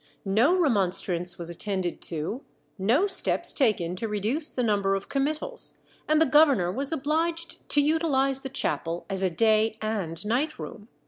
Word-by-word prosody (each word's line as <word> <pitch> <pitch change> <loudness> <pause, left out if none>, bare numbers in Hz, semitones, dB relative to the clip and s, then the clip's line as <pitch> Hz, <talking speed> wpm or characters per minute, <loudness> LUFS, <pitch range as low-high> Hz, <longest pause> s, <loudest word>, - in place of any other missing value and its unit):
No 225 - +3
remonstrance 185 - +1
was 170 - -5
attended 185 0 -3
to, 170 - -4 0.4
no 235 - +2
steps 390 -2 +3
taken 190 - +1
to 225 - -3
reduce 220 +9 -1
the 250 - -2
number 200 -3 +1
of 195 - -6
committals, 305 - -2 0.3
and 310 0 +3
the 320 - +5
governor 270 - +4
was 275 - -1
obliged 325 +3 -2
to 290 - +3
utilize 280 -3 +1
the 265 - -6
chapel 170 -9 -3
as 190 -1 -2
a 190 - +2
day 220 +4 +2
and 205 -5 -4
night 265 +8 -1
room. 210 -1 -9
225 Hz, 155 wpm, -26 LUFS, 195-295 Hz, 0.4 s, the